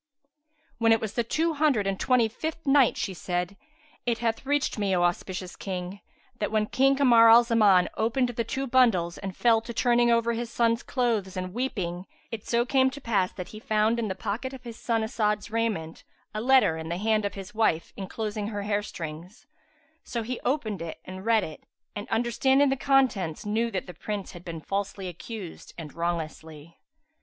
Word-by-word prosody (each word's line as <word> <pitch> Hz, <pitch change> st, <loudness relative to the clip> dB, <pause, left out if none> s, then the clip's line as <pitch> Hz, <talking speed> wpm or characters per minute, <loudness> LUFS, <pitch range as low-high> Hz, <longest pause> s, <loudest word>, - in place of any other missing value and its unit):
When 225 Hz, -1 st, +4 dB
it 225 Hz, -, +5 dB
was 215 Hz, -2 st, -4 dB
the 235 Hz, -, 0 dB
Two 320 Hz, +8 st, 0 dB
Hundred 285 Hz, -9 st, +2 dB
and 195 Hz, -1 st, -1 dB
Twenty 250 Hz, -3 st, +3 dB
fifth 315 Hz, +8 st, -5 dB
Night, 275 Hz, -3 st, +4 dB
She 200 Hz, -2 st, -2 dB
said, 180 Hz, +1 st, -3 dB, 0.5 s
It 235 Hz, -2 st, 0 dB
hath 230 Hz, +2 st, -2 dB
reached 285 Hz, -5 st, 0 dB
me, 195 Hz, -2 st, +1 dB
O 175 Hz, -, +2 dB
auspicious 180 Hz, +1 st, -2 dB
King, 185 Hz, 0 st, -5 dB, 0.4 s
that 210 Hz, -, -1 dB
when 215 Hz, -1 st, +2 dB
King 270 Hz, +5 st, +3 dB
Kamar 235 Hz, -5 st, +6 dB
la 235 Hz, +1 st, +8 dB
Zaman 210 Hz, -6 st, +4 dB
opened 245 Hz, +3 st, +1 dB
the 235 Hz, -1 st, -2 dB
two 265 Hz, +4 st, -3 dB
bundles 230 Hz, -10 st, +3 dB
and 195 Hz, -2 st, -6 dB
fell 230 Hz, -2 st, +4 dB
to 230 Hz, +1 st, -7 dB
turning 240 Hz, 0 st, +3 dB
over 235 Hz, 0 st, +2 dB
his 235 Hz, 0 st, -3 dB
sons' 230 Hz, 0 st, +1 dB
clothes 225 Hz, -7 st, -1 dB
and 185 Hz, 0 st, -4 dB
weeping, 190 Hz, -7 st, -3 dB, 0.2 s
it 225 Hz, -2 st, -5 dB
so 235 Hz, 0 st, +2 dB
came 265 Hz, 0 st, +3 dB
to 280 Hz, +2 st, -9 dB
pass 205 Hz, -8 st, 0 dB
that 180 Hz, -2 st, -7 dB
he 215 Hz, -, -9 dB
found, 215 Hz, +2 st, +1 dB
in 225 Hz, -, -1 dB
the 190 Hz, -, -3 dB
pocket 225 Hz, +7 st, -4 dB
of 260 Hz, -2 st, -10 dB
his 235 Hz, -2 st, -8 dB
son 225 Hz, -2 st, 0 dB
As'ad's 215 Hz, -1 st, -1 dB
raiment, 215 Hz, -8 st, -2 dB, 0.3 s
a 215 Hz, -, -3 dB
letter 255 Hz, -9 st, +4 dB
in 160 Hz, 0 st, -6 dB
the 170 Hz, -, -2 dB
hand 215 Hz, +2 st, +1 dB
of 200 Hz, -, -3 dB
his 195 Hz, +3 st, -8 dB
wife 215 Hz, -7 st, +1 dB
enclosing 210 Hz, +1 st, -4 dB
her 205 Hz, -2 st, -4 dB
hair 205 Hz, 0 st, 0 dB
strings; 175 Hz, +1 st, -8 dB, 0.6 s
so 235 Hz, -2 st, -4 dB
he 245 Hz, +2 st, -4 dB
opened 225 Hz, -, -1 dB, 0.2 s
and 185 Hz, +2 st, -8 dB
read 225 Hz, -3 st, +4 dB
it 155 Hz, -3 st, -8 dB, 0.3 s
and 205 Hz, 0 st, -6 dB
understanding 265 Hz, +5 st, +3 dB
the 270 Hz, -, +1 dB
contents 255 Hz, -, +1 dB
knew 225 Hz, +3 st, 0 dB
that 190 Hz, -5 st, -3 dB
the 180 Hz, -, -9 dB
Prince 200 Hz, +3 st, -5 dB
had 175 Hz, -1 st, -11 dB
been 165 Hz, -3 st, -6 dB
falsely 195 Hz, +1 st, -3 dB
accused 180 Hz, +1 st, -8 dB
and 160 Hz, -3 st, -8 dB
wrongously. 160 Hz, -2 st, -5 dB
220 Hz, 190 wpm, -27 LUFS, 190-240 Hz, 0.6 s, la